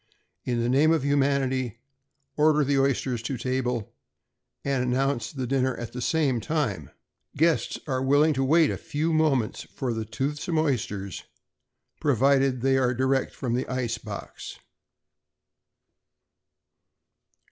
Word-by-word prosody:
In 120 -2 0
the - - 0
name 140 +6 +4
of 160 -4 +1
humanity, 135 -4 +1 0.6
order 150 0 +4
the 140 0 +1
oysters 135 -3 0
to 125 +3 -3
table 125 -2 -2 0.7
and 135 -2 +1
announce 125 -1 0
the 130 -3 -4
dinner 130 0 0
at 120 -1 -7
the 125 - -5
same 140 -4 +1
time. 110 - -2 0.5
Guests 165 +2 +2
are 130 -4 -1
willing 145 +4 +4
to 135 -1 0
wait 155 +3 +4
a - - -3
few 160 +3 -2
moments 145 -8 +1
for 115 -4 -4
toothsome 140 +9 -3
oysters, 105 - -2 0.7
provided 135 -1 +2
they 135 +1 +3
are 125 -1 +1
direct 130 +1 0
from 125 -3 -3
the 125 - -1
ice 120 -3 -2
box. 105 -3 -8
130 Hz, 125 wpm, -26 LUFS, 125-145 Hz, 0.7 s, name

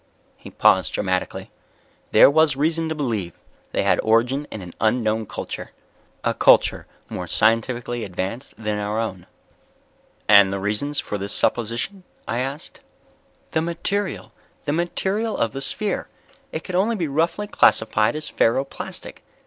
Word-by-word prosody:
He - - -12
paused - - +3
dramatically. 95 -2 -2 0.6
"There - - +8
was 155 -1 +4
reason 160 +3 0
to 160 - -2
believe 110 - -2 0.4
they - - 0
had - - +3
origin 120 +6 +2
in 105 - -7
an 90 - -10
unknown 110 -1 +1
culture. - - -6 0.5
A - - +1
culture - - +4 0.2
more - - -5
scientifically 120 +1 +1
advanced 95 +7 -5
than 105 -2 -2
our 105 +1 -2
own." 95 -6 -4 1.0
"And 100 -2 +7
the 100 - -1
reasons 105 +9 -1
for 105 - -4
this 100 +1 -4
supposition?" 120 - -1 0.2
I 120 -1 -1
asked. 135 +4 -5 0.7
"The 160 - +1
material... 185 +4 -2 0.3
the 145 - 0
material 190 +6 -1
of 115 - 0
the 135 - -6
sphere. 210 +9 -2 0.4
It - - -4
could 185 - -7
only 205 +6 +2
be 175 -6 -1
roughly 165 +8 0
classified 110 - +3
as 155 - -2
ferro 120 +4 +2
plastic. - - -8
125 Hz, 145 wpm, -22 LUFS, 110-160 Hz, 1.0 s, There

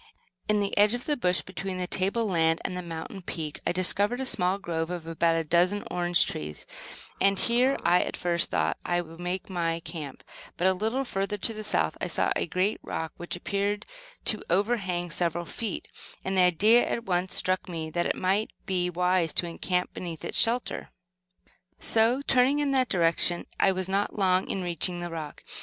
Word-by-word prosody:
In 210 0 +3
the 200 - -1
edge 210 +3 +5
of 245 - -6
the 300 - +1
bush 180 -8 +2
between 190 +1 -5
the 180 - -1
table 195 +6 0
land 165 -4 +2
and 185 - -2
the 180 - -3
mountain 170 +2 -7
peak, 160 -4 -5
I - - +2
discovered 200 +6 +1
a 265 - -2
small 185 -5 +2
grove 165 -4 -3
of 175 -2 -5
about 165 0 +1
a 165 - 0
dozen 175 +6 +2
orange 175 -1 +4
trees, 75 0 -5 0.6
and 195 0 +4
here 250 +5 +3
I 175 +1 +4
at - - -3
first 170 -1 +1
thought 80 -2 0
that - - -7
I 175 0 +2
would 165 0 -12
make 180 +1 -3
my 170 -3 -1
camp; 150 -5 -8 0.3
but 175 - 0
a 190 - +5
little 220 +8 -1
further 200 -4 -2
to 225 - +1
the 215 0 -6
south 210 - +1
I - - 0
saw - - 0
a - - -1
great 190 +4 0
rock, 160 0 -4
which 175 - -5
appeared 200 +3 -2 0.4
to 215 - +3
over 205 +7 +2
hang 175 -4 -3
several 175 +1 -1
feet; 220 +3 -5 0.4
and 190 - -1
the 185 -1 +6
idea 210 +8 +5
at 235 - -3
once 180 -1 -1
struck 185 +1 0
me 160 -2 -4
that 175 +1 0
it - - 0
might 195 +4 0 0.2
be 180 -3 0
wise 180 -1 +1
to - - +3
encamp 180 +1 -2
beneath 170 -3 -6
its - - +1
shelter. 240 +2 +1 0.9
So, 230 +5 +3
turning 265 +1 +3
in 290 -1 +1
that 260 -2 +2
direction 175 -1 +2
I 195 - +4
was 185 -1 -2
not 195 +2 -1
long 185 -2 +2
in 190 - -2
reaching 175 +1 -1
the 175 -1 -5
rock. 155 -3 -7
185 Hz, 200 wpm, -27 LUFS, 170-205 Hz, 0.9 s, the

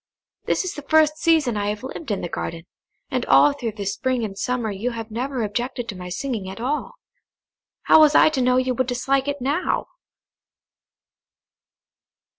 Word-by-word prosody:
This - - 0
is 365 - -3
the 295 - -7
first 310 +1 +3
season 315 -8 +2
I 205 -1 -1
have 210 +3 -4
lived 275 +2 -7
in 205 - -1
the - - -3
garden, 165 0 -5 0.5
and - - 0
all 290 - +6
through 240 -6 -4
the 205 -2 -6
spring 245 +4 -1
and 195 -2 -7
summer 240 +1 -2
you 205 +5 -2
have 225 -2 -7
never 250 +2 -2
objected 240 +3 -3
to 205 - -4
my 180 0 -7
singing 210 0 -4
at 190 - -8
all. 275 +6 -2 0.9
How - - +6
was 305 -1 +6
I - - +7
to 290 -4 -1
know 250 0 +3
you 255 0 +1
would 255 +1 -1
dislike 270 +2 0
it 285 -1 -3
now?" 290 +8 -1
250 Hz, 180 wpm, -22 LUFS, 215-280 Hz, 0.9 s, I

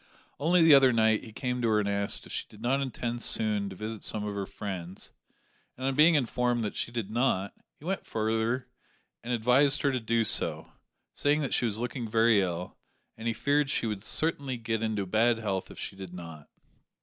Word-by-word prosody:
Only 170 +3 +4
the 160 -2 +8
other 135 -2 +7
night 110 -1 +2
he 110 - -10
came 125 +2 -3
to 115 - +1
her 110 -1 +3
and 105 - -1
asked 100 0 -1
if - - -11
she - - -3
did 105 - -16
not 130 +4 0
intend 120 -2 -3
soon 105 -4 +1
to 95 - -9
visit 110 +2 -6
some 105 -1 -3
of 105 - -3
her 100 -1 -4
friends; 95 -2 -7 0.7
and 130 - -5
on 135 - +1
being 155 +4 +5
informed 125 -3 +1
that 105 - -3
she - - -3
did 115 -4 -4
not, 110 -5 0 0.2
he 150 - -15
went 190 +2 -2
further 115 +3 -1 0.6
and 120 - -4
advised 125 +5 +3
her 140 - +3
to 130 - -1
do 115 0 +1
so, 85 -7 +2 0.4
saying 145 +1 +1
that 140 - -2
she - - +2
was 110 -2 0
looking 120 -1 -4
very 110 -1 +4
ill, 90 0 -4 0.4
and 115 +1 -6
he 115 - +1
feared 145 0 +1
she 140 - 0
would 105 -3 -3
certainly 140 -1 0
get 115 -1 -2
into 110 -3 -1
bad 115 +5 +2
health 100 -4 -3
if - - -12
she - - -5
did 95 -2 -9
not. 80 -4 -10
115 Hz, 210 wpm, -29 LUFS, 105-125 Hz, 0.7 s, the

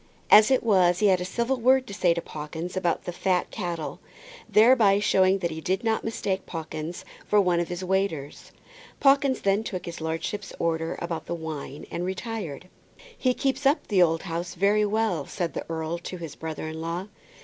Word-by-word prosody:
As 215 0 +9
it 260 -1 +3
was 185 -6 +4
he 210 +1 +3
had 185 -1 +3
a - - -2
civil 235 +7 -1
word 255 +2 +4
to 200 - -9
say 180 -3 +2
to 170 - -3
Pawkins 160 +4 -6
about 180 -3 0
the - - -4
fat 180 0 0
cattle, 170 -6 -4 0.5
thereby 215 -3 +6
showing 190 -2 +3
that 175 -3 -2
he 160 0 -6
did 185 +4 -1
not 225 -1 0
mistake 200 -4 -2
Pawkins 160 0 -6 0.2
for 210 - +4
one 180 -3 +3
of 170 - -2
the 175 +1 -4
waiters. 185 -7 -2 0.5
Pawkins 275 -2 +4
then 200 +2 +2
took 185 -5 -5
his 170 -1 -7
lordship's 165 +5 -3
orders 165 -1 -1
about 170 -1 -4
the 170 - -2
wine 155 -3 -6
and 175 - -3
retired. 185 - -5 0.5
"He 255 -1 +1
keeps 270 +1 -1
up 290 +4 +1
the 195 -4 +4
old 165 -2 +3
house 175 0 -4
pretty 205 +3 +3
well," 205 -8 0
said 175 -3 -3
the - - -5
earl 165 +1 -3
to 180 +2 -7
his 165 -4 -7
brother 160 -1 -6
in 160 0 -6
law. 170 +3 -3
180 Hz, 195 wpm, -26 LUFS, 165-210 Hz, 0.5 s, As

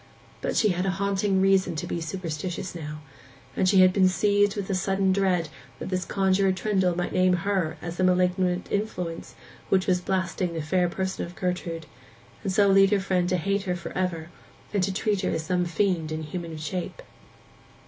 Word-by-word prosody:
But - - -2
she 215 - +4
had 180 +1 0
a 190 0 -1
haunting 195 -1 +1
reason 190 -3 +3
to 150 - -3
be 170 - -3
superstitious 175 +2 -4
now; 150 -2 -7 0.5
and 185 - +2
she 190 -1 +6
had 185 0 +6
been 190 -1 +4
seized 205 +2 +2
with 195 -2 -2
sudden 190 0 +1
dread 185 -5 +1 0.3
that - - -6
this 185 -1 -1
Conjuror 190 0 +2
Trendle 190 -2 +1
might 175 - -2
name 185 0 +4
her 190 -6 0
as 170 0 -5
the 185 - +1
malignant 180 0 +2
influence 180 -5 -3 0.3
which 190 -1 +3
was 180 -1 +2
blasting 185 -1 -1
the 160 - -2
fair 180 +3 +1
person 190 +1 -3
of 175 +1 -8
Gertrude, 180 -3 -3 0.6
and 195 - -2
so 200 +1 +4
lead 195 0 +6
her 205 -1 +2
friend 185 -2 0
to 180 - +2
hate 200 +3 -1
her 180 -1 -1
for 170 -1 -7
ever, 175 -3 -3 0.4
and 200 - +2
to 190 +2 +1
treat 200 0 0
her - - 0
as 160 - -2
some 180 0 +1
fiend 170 -2 0
in 155 0 -3
human 165 +1 -6
shape. 175 - -5
185 Hz, 190 wpm, -26 LUFS, 175-195 Hz, 0.6 s, she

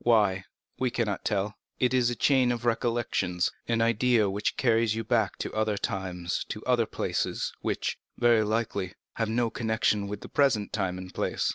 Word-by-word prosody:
—why, 105 -5 +3 0.4
we 130 - +2
cannot 115 -5 -1
tell. 105 0 0 0.2
It 125 0 +2
is 125 -2 +3
a 120 - -2
chain 130 -1 +3
of 120 0 -3
recollections—an 115 -2 0
idea 115 -1 +3
which 105 +1 -1
carries 115 -3 +3
you 115 - -2
back 110 -3 +1
to - - -4
other 110 -1 0
times, 90 -3 -2
to - - -5
other - - +2
places—which, - - -2 0.2
very 120 -2 +4
likely, 105 -3 -1 0.2
have 115 -1 0
no 115 0 +1
connection 110 -2 0
with 105 0 -5
the - - -8
present 130 -8 +2
time 95 -4 -1
and 90 0 -8
place. - - -1
110 Hz, 165 wpm, -28 LUFS, 100-120 Hz, 0.4 s, very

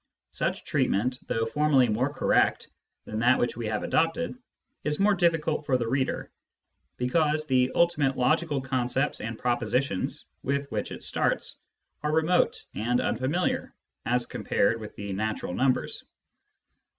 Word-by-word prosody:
Such - - -2
treatment, 125 +6 +1
though 115 0 0
formally 140 +1 +3
more 120 +6 0
correct - - +2 0.4
than 110 - -4
that 125 +3 +4
which 120 - 0
we 115 -1 -4
have 105 -1 -2
adopted, 165 +10 +1 0.5
is 150 0 -1
more 205 +1 +4
difficult 165 -4 +1
for 130 - +3
the 120 -2 -2
reader, 130 +2 -1 0.7
because 150 +4 +1
the 130 -2 +2
ultimate 150 -6 +2
logical 155 +3 +2
concepts 130 +1 0
and 115 0 -4
propositions 120 -2 -1 0.2
with 140 +1 -2
which - - -3
it - - -7
starts - - -1 0.4
are 150 - 0
remote 160 +3 +2
and 120 +3 0
unfamiliar 140 +10 -1 0.3
as 125 0 +1
compared 115 +3 0
with 105 - -8
the 100 -1 -5
natural 110 -2 -2
numbers. 130 +5 0
130 Hz, 140 wpm, -27 LUFS, 120-150 Hz, 0.7 s, that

